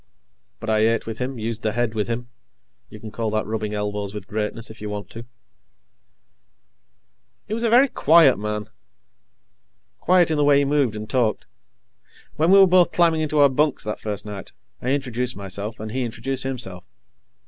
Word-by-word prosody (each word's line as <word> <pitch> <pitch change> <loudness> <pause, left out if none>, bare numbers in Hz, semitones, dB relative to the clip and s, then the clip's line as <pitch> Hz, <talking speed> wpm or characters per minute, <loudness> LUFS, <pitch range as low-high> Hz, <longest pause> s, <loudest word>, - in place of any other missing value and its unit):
But - - -3
I 110 - +3
ate 115 +1 +2
with 115 0 -6
him, 130 +1 -3
used 115 0 -4
the 110 -1 -1
head 120 -1 -1
with 105 -2 -1
him; 120 +1 -4 0.6
you 105 - -11
can 110 0 -9
call 115 0 -2
that 110 0 -1
rubbing 110 -1 -3
elbows 105 -1 -3
with 100 -2 -7
greatness, 110 +2 -4
if 110 - -14
you 105 - -5
want 105 0 -6
to. 115 +1 -9 2.2
He 210 - -4
was 230 - -2
a 235 - +1
very 250 +5 +6
quiet 160 - +5
man. 105 0 -3 1.3
Quiet 175 -2 +3
in 155 - +1
the 145 - +2
way 145 -1 +5
he 140 - +3
moved 140 -6 +1
and 105 0 -6
talked. 115 -2 0 0.9
When 160 +2 +2
we 195 - +7
were 195 - +9
both 180 -1 +4
climbing 165 -2 +3
into 155 -1 -1
our 140 - +7
bunks, 145 +2 +1
that 105 - -4
first 105 -1 -4
night, 100 -3 -8 0.3
I 125 - -2
introduced 125 -3 -1
myself 100 +2 -6
and 110 0 -6
he 130 +2 -2
introduced 130 +3 -4
himself. 120 -9 -5
115 Hz, 185 wpm, -22 LUFS, 105-145 Hz, 2.2 s, were